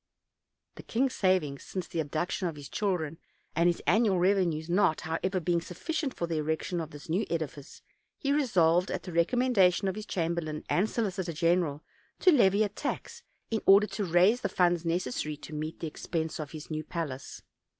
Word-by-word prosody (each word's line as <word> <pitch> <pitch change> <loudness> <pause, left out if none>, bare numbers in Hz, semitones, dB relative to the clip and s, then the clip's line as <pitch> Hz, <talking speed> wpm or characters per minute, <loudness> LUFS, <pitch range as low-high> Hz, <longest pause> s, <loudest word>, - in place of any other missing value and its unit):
The - - -7
king's 255 +3 0
savings 180 -8 +1
since 185 -2 -5
the 170 - -4
abduction 160 +4 -1
of 165 - -4
his 145 -2 -9
children 165 +1 -1 0.4
and 170 +1 +4
his 175 - -2
annual 210 -1 +3
revenues 175 -4 +2
not, 175 -2 +2
however, 185 +4 -1
being 170 0 +1
sufficient 270 - -3
for 170 - -2
the 165 -1 -2
erection 160 +3 -1
of 160 - -6
this 145 -1 -11
new 175 +6 +1
edifice, 155 -3 -5 0.3
he 280 - -1
resolved, 180 - +3
at - - -3
the 180 - -7
recom 180 +10 +2
mendation 190 -1 +4
of 190 - 0
his 215 +2 -7
chamberlain 165 -3 -2
and 200 +5 +2
solicitor 190 -6 -2
general, 165 -2 +1 0.4
to 370 - +6
levy 210 - +5
a 210 - 0
tax, 470 - -5 0.3
in 220 - 0
order 200 +2 +8
to 210 - -4
raise 185 +7 +4
the 200 - -1
funds 175 -2 +2
necessary 155 -3 -2
to 155 - -10
meet 155 +2 -5
the 165 - -2
expense 160 +1 -3
of 150 -2 -5
his 155 0 -9
new 155 0 -2
palace. 150 -5 -5
175 Hz, 185 wpm, -29 LUFS, 160-195 Hz, 0.4 s, order